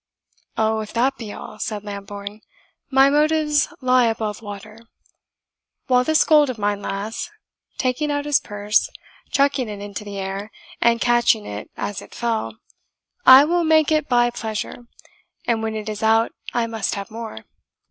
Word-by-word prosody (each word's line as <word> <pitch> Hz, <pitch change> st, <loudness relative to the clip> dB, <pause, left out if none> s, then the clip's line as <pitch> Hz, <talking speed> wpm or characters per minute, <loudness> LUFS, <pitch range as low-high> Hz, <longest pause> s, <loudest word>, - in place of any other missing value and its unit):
"Oh, 220 Hz, 0 st, +1 dB
if 215 Hz, -1 st, -6 dB
that 260 Hz, +3 st, +1 dB
be 220 Hz, -3 st, -7 dB
all," 215 Hz, -, -9 dB
said 210 Hz, -2 st, -4 dB
Lambourne, 200 Hz, +1 st, -7 dB, 0.5 s
"my 270 Hz, 0 st, +5 dB
motives 300 Hz, -1 st, +2 dB
lie 255 Hz, -1 st, +4 dB
above 220 Hz, -2 st, -2 dB
water. 210 Hz, +1 st, -9 dB, 1.1 s
While 250 Hz, -1 st, +3 dB
this 315 Hz, +3 st, +3 dB
gold 300 Hz, -3 st, +5 dB
of 250 Hz, -, -4 dB
mine 205 Hz, -1 st, -1 dB
lasts" 200 Hz, +3 st, -4 dB, 0.5 s
taking 255 Hz, +3 st, 0 dB
out 290 Hz, 0 st, -1 dB
his 295 Hz, -1 st, +3 dB
purse, 205 Hz, +1 st, 0 dB, 0.4 s
chucking 275 Hz, -4 st, +1 dB
it 205 Hz, -1 st, -6 dB
into 205 Hz, +1 st, -6 dB
the 205 Hz, -1 st, -7 dB
air, 195 Hz, +2 st, -4 dB, 0.3 s
and 235 Hz, 0 st, +3 dB
catching 240 Hz, -2 st, +3 dB
it 105 Hz, +1 st, -7 dB
as 205 Hz, -, -4 dB
it -, -, -14 dB
fell 220 Hz, -, -2 dB, 0.7 s
"I 260 Hz, +2 st, +10 dB
will 345 Hz, +2 st, +1 dB
make 315 Hz, -1 st, +4 dB
it 305 Hz, -3 st, +1 dB
buy 240 Hz, -1 st, +3 dB
pleasure; 225 Hz, +1 st, -5 dB, 0.6 s
and 230 Hz, -2 st, +1 dB
when 220 Hz, 0 st, -3 dB
it 215 Hz, -1 st, -5 dB
is 215 Hz, -1 st, -4 dB
out 225 Hz, +1 st, +3 dB, 0.2 s
I 240 Hz, -1 st, 0 dB
must 225 Hz, -3 st, -2 dB
have 200 Hz, 0 st, -6 dB
more. 220 Hz, -, -7 dB
225 Hz, 160 wpm, -22 LUFS, 205-260 Hz, 1.1 s, I